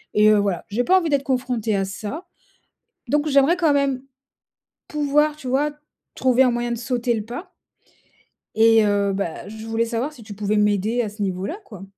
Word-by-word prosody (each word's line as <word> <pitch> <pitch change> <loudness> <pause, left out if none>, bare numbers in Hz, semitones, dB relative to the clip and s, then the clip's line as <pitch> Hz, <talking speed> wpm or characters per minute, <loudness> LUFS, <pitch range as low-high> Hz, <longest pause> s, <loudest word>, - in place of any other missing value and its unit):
et 210 0 +6
heu, 210 - +5
voilà, 195 -4 -1
j'ai 235 +4 0
pas 375 +1 +5
envie 335 -3 -2
d'être 280 -1 +1
confrontée 250 -5 -1
à 195 -1 0
ça. 215 - -6 0.8
Donc 295 +2 +1
j'aimerais 280 +5 +4
quand 320 -5 +3
même 275 -2 +1 0.9
pouvoir, 300 0 +1
tu 265 - -9
vois, 285 +4 +1 0.4
trouver 260 0 +3
un 250 - +3
moyen 240 0 -2
de - - -3
sauter 240 0 -1
le 215 -1 -4
pas 245 - -8 1.0
et 225 0 +5
heu, 200 -1 +1
bah, 190 -3 -4
je 220 +1 -9
voulais 225 +1 0
savoir 240 +6 -3
si 245 - -14
tu 210 -1 -9
pouvais 210 +1 -1
m'aider 210 +3 +1
à 215 - -3
ce 210 0 -10
niveau 185 0 -2
là, 355 - -4
quoi? 195 -4 -11
235 Hz, 195 wpm, -22 LUFS, 210-275 Hz, 1.0 s, et